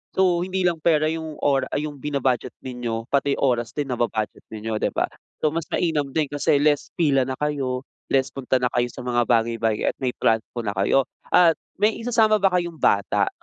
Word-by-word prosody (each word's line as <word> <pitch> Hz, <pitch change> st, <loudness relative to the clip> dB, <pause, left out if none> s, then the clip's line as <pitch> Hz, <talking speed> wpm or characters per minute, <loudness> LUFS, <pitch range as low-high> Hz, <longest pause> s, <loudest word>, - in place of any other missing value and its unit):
So, 180 Hz, -2 st, +3 dB
hindi 190 Hz, 0 st, -2 dB
lang 170 Hz, -2 st, 0 dB
pera 155 Hz, -2 st, +3 dB
yung 160 Hz, -1 st, -4 dB
ora 140 Hz, -2 st, +2 dB
ay 150 Hz, +1 st, -1 dB
yung 145 Hz, -, -9 dB
bina-budget 135 Hz, -4 st, 0 dB
ninyo 120 Hz, -3 st, -4 dB
pati 140 Hz, 0 st, +2 dB
oras 120 Hz, -4 st, +1 dB
din 145 Hz, +3 st, -3 dB
naba-budget 115 Hz, -3 st, -2 dB
din 110 Hz, -1 st, -7 dB
ninyo, 110 Hz, -1 st, -1 dB
'di -, -, +1 dB
ba? -, -, +1 dB, 0.3 s
So, 155 Hz, -, +3 dB
mas 165 Hz, 0 st, -3 dB
mainam 155 Hz, -5 st, 0 dB
din 155 Hz, -2 st, +1 dB
kasi 145 Hz, 0 st, +2 dB
less 150 Hz, -1 st, +2 dB
pila 140 Hz, -5 st, +3 dB
na 130 Hz, -, -2 dB
kayo, 135 Hz, -4 st, -1 dB, 0.3 s
less 135 Hz, -1 st, +2 dB
punta 130 Hz, -1 st, 0 dB
na 125 Hz, -, +2 dB
kayo 120 Hz, 0 st, +2 dB
sa -, -, -9 dB
mga 120 Hz, -1 st, +2 dB
bagay-bagay 115 Hz, -2 st, +1 dB
at -, -, -30 dB
may 130 Hz, -2 st, 0 dB
transpo 115 Hz, +2 st, 0 dB
na 105 Hz, -, -1 dB
kayo. 100 Hz, +8 st, +3 dB, 0.3 s
At 170 Hz, -3 st, +6 dB, 0.2 s
may 215 Hz, +2 st, +2 dB
isasama 225 Hz, -2 st, +3 dB
ba 195 Hz, -, +5 dB
kayong 170 Hz, -3 st, -2 dB
bata? 100 Hz, 0 st, +2 dB
140 Hz, 200 wpm, -23 LUFS, 120-160 Hz, 0.3 s, At